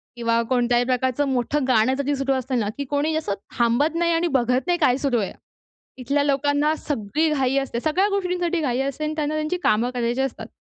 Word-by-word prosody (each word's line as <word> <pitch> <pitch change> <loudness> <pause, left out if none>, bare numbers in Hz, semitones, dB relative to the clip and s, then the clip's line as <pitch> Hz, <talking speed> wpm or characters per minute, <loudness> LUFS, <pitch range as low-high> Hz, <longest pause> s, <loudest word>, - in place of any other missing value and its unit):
किंवा 230 -1 +1
कोणत्याही 245 -1 +2
प्रकारचं 260 +2 0
मोठं 265 +2 0
गाणं 255 +1 +3
जरी 280 +1 0
सुरू 275 0 0
असतं 260 -1 -1
ना 210 -1 -1
की 280 - -3
कोणी, 290 +3 -1
असं 300 -11 -1 0.2
थांबत 240 +7 +2
नाही 340 0 +1
आणि 335 +1 +1
बघत 250 +5 0
नाही 350 -1 +2
काय 255 -4 +3
सुरू 270 -5 0
आहे. 195 - -3 0.7
इथल्या 285 +3 +1
लोकांना 285 +2 +1
सगळी 290 +3 -1
घाई 270 -2 +1
असते. 270 -3 -1
सगळ्या, 355 +8 +1
गोष्टींसाठी 360 -3 -1
घाई 255 -3 0
असते 275 +2 -3
आणि 305 0 -1
त्यांना 305 0 -1
त्यांची 310 +4 -1
कामं 230 +4 +2
करायची 240 +1 -1
असतात. 235 -4 -4
275 Hz, 200 wpm, -23 LUFS, 245-305 Hz, 0.7 s, गाणं